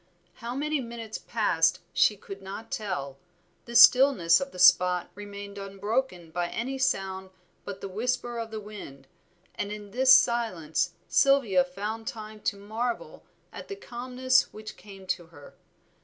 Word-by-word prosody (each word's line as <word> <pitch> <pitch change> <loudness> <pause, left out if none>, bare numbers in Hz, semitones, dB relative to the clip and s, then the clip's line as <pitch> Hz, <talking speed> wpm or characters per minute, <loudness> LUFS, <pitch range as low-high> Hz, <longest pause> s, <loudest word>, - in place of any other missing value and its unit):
How 235 +1 -6
many 300 +1 -1
minutes 230 -2 -7
passed 165 -8 +1
she 210 - +3
could 195 0 -10
not 195 +4 -8
tell, 140 -10 -4 0.5
the 235 - -9
stillness 240 -8 +7
of 275 0 -4
the - - -12
spot 180 0 +5
remained 200 0 -9
unbroken 195 -2 -3
by 175 +1 -1
any 265 +8 -4
sound 190 -7 -1 0.4
but 200 -1 -7
the - - -4
whisper 240 +4 -2
of 225 -1 -5
the 220 -1 -5
wind, 200 -11 -10 0.5
and 205 - -4
in 210 -1 -8
this 260 +4 +4
silence 185 -10 +3
Sylvia 250 -10 +4
found 210 +5 -6
time 215 -1 -7
to 200 - -2
marvel 225 +4 -4 0.3
at - - -9
the 400 - -6
calmness 255 -4 0
which 215 0 -9
came 195 0 -13
to 175 -2 -3
her. 145 -3 -15
210 Hz, 150 wpm, -27 LUFS, 185-240 Hz, 0.5 s, stillness